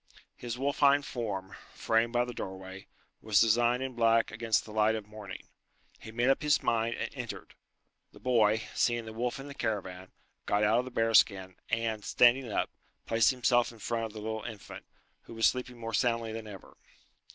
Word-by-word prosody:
His 120 -1 -6
wolfine 140 +1 +3
form, 100 -8 -5 0.2
framed 115 +1 +1
by 120 0 +1
the 125 - -7
doorway, 95 -1 -8 0.3
was 105 -2 +3
designed 120 +3 +3
in 130 -1 -4
black 115 -1 +3
against 110 0 0
the 110 - -11
light 110 +1 +2
of 110 -2 -5
morning. 105 -3 -9 0.6
He 110 - -10
made 120 +3 +1
up 135 - +3
his 150 -1 +2
mind, 115 0 +1
and 115 - -4
entered. 125 -4 -7 0.6
The - - -16
boy, 110 -3 +2
seeing 120 -1 +1
the 110 - -8
wolf 120 +3 -2
in 135 - -8
the 140 - -8
caravan, 95 -7 -4 0.4
got 105 +1 +2
out 110 +3 +4
of 125 - -2
the - - -6
bear 115 -2 0
skin, 95 -3 +3
and, 115 -3 -1
standing 125 +1 +4
up, - - -1 0.3
placed 115 0 +3
himself 120 -2 +2
in 115 - -15
front 115 +2 -2
of 110 - -8
the 110 - -7
little 110 0 -4
infant, 110 -4 -9 0.4
who 115 - -11
was 115 - +2
sleeping 125 -1 0
more 115 -1 -6
soundly 115 -2 +1
than 110 -1 -6
ever. 100 -3 -12
115 Hz, 190 wpm, -30 LUFS, 110-120 Hz, 0.6 s, out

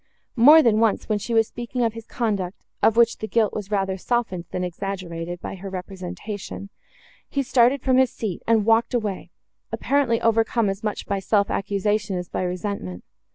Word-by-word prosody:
More 295 +7 +8
than 220 -2 +3
once, 225 -2 +1
when 215 -2 0
she 230 +3 -3
was 225 -1 +4
speaking 240 +1 -4
of 225 -2 +1
his 230 -1 -10
conduct, 200 -6 -2 0.2
of 225 - +3
which 235 -1 +4
the 220 - -4
guilt 220 -1 +1
was 205 -2 -5
rather 195 -2 -1
softened, 220 -6 -1
than 180 - -3
exaggerated, 175 -2 -5
by - - -5
her 195 +1 -7
representation, 190 +2 -7 0.6
he 280 - -1
started 255 +1 +3
from 260 -1 +3
his 260 -1 +4
seat, 205 -6 -4
and 225 -2 +3
walked 230 +2 +3
away, 210 -5 -2 0.4
apparently 275 -5 +1
overcome 225 -1 +2
as 195 +1 -7
much 210 -1 -3
by 200 -1 -1
self 200 +1 +1
accusation 200 0 -1
as 180 -1 -5
by - - -3
resentment. 180 - -4
210 Hz, 180 wpm, -23 LUFS, 190-230 Hz, 0.6 s, More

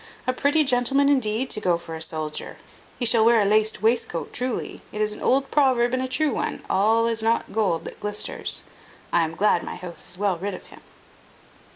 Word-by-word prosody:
A 255 - +1
pretty 290 +4 +2
gentleman, 270 +1 +2
indeed, 255 -2 +1
to 215 - +1
go 175 -4 +2
for 170 -1 -10
a 160 - -6
soldier! 155 -1 -3 0.4
He 245 - -2
shall 225 -1 +4
wear 230 0 +5
a 205 - +3
laced 215 +1 +2
wastecoat 225 -7 0
truly. 250 -1 -3
It 210 - -6
is 215 0 +1
an - - -9
old 270 +1 +1
proverb 255 -4 +3
and 255 - 0
a 260 - -2
true 290 +3 0
one, - - -3
all 220 +4 +3
is 230 -1 0
not 225 +1 0
gold 195 -6 0
that - - -9
glisters. 210 0 -1 0.5
I 170 - +4
am 165 0 -2
glad 200 -3 +2
my - - -6
house 175 -2 -7
is - - -2
well 195 -3 0
rid 200 +1 -3
of - - -12
him." - - -15
220 Hz, 210 wpm, -24 LUFS, 195-255 Hz, 0.5 s, wear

